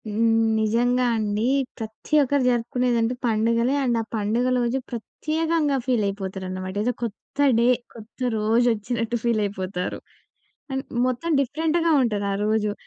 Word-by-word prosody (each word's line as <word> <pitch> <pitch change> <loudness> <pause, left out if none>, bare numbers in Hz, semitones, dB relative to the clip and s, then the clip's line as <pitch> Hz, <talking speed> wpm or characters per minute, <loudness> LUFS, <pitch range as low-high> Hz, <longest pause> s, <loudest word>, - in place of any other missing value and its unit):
హ్మ్. 225 +2 +2 0.2
నిజంగా 240 +3 +2
అండి. 210 -1 -1 0.3
ప్రతి 220 +6 -8
ఒక్కరు 280 0 +1
జరుపుకునేదంటే 240 0 +1
పండుగలే. 230 +2 +2
అండ్ 240 -3 +1
ఆ - - -4
పండుగ 220 +3 0
రోజు 240 +2 0
ప్రత్యేకంగా 310 +5 -1
ఫీల్ 245 -4 +1
అయిపోతారనమాట. 190 -1 -5
ఏదో 245 +2 +1
కొత్త 230 +3 -7 0.2
డే, 235 - +4 0.3
కొత్త 225 +1 -14 0.2
రోజు 225 +3 +2
వచ్చినట్టు 230 +2 -2
ఫీల్ 235 -2 +1
అయిపోతారు. 185 -2 -4 0.7
అండ్ 265 0 -2 0.2
మొత్తం 255 +7 -2
డిఫరెంట్‌గా 320 +5 0
ఉంటది 210 -5 0
ఆ - - -1
రోజు. 215 -1 +1
230 Hz, 130 wpm, -24 LUFS, 215-250 Hz, 0.7 s, డే